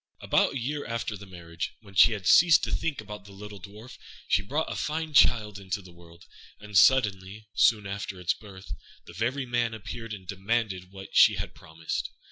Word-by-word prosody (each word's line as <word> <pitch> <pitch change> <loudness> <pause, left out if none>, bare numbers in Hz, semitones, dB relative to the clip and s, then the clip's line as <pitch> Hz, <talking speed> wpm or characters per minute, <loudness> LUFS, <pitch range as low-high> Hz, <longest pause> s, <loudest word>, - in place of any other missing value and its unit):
About - - +2
a - - -2
year 145 +4 -3
after 115 -2 -3
the 100 0 -11
marriage, 85 -2 -6
when 100 -3 -16
she 100 +4 +6
had 100 -3 -6
ceased 170 - +6
to - - -2
think 150 -8 -2
about 105 -2 -10
the 100 - -13
little 105 +1 -10
Dwarf, 105 +6 -12 0.3
she - - +3
brought 145 +10 -2
a - - -4
fine 155 0 -3
child 105 -7 +4
into 100 +1 -4
the 90 -2 -14
world; 85 0 -17 0.3
and, 105 -1 -11
suddenly, 105 -3 +3
soon 105 -3 +3
after 100 -1 -5
its 90 -1 +1
birth, 100 -3 -11 0.3
the 85 - -12
very 125 +8 -2
man 120 -2 -1
appeared 115 +1 -8
and 95 -2 -14
demanded 95 -1 -2
what 95 0 -11
she - - +7
had - - -5
promised. 80 0 -5
105 Hz, 195 wpm, -27 LUFS, 95-120 Hz, 0.3 s, she